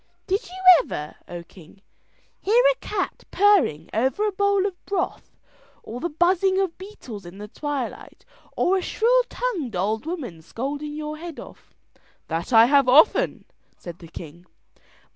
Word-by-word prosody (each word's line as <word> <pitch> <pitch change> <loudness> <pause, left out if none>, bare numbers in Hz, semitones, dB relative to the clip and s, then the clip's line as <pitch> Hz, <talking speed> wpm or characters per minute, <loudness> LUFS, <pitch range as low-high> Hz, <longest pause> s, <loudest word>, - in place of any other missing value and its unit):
"Did 390 +2 -1
you 365 - -10 0.3
ever, 150 0 -6
O 175 -1 -7
king, 180 +3 -18 0.6
hear 460 +5 +3
a - - -3
cat 390 -3 -3
purring 370 - +3
over 265 - +1
a 420 - +1
bowl 400 0 +1
of 380 -3 -5
broth, 380 -2 -3 0.5
or 235 +3 -7
the 345 - -2
buzzing 370 +4 +2
of 380 -4 -1
beetles 320 - -10
in 175 +2 -11
the 210 +1 -8
twilight, 280 +1 -6 0.3
or 380 +2 +3
a - - -1
shrill - - +2
tongued 370 - -3
old 215 - -1
woman 255 - -5
scolding 285 - -5
your 305 0 -5
head 335 -2 -8
off?" - - -14 0.5
"That 165 +5 -3
I 225 -1 +8
have 275 0 +4
often," 315 - +4 0.3
said 175 -1 -10
the 170 - -12
king. 170 +2 -11
300 Hz, 155 wpm, -23 LUFS, -, 0.6 s, I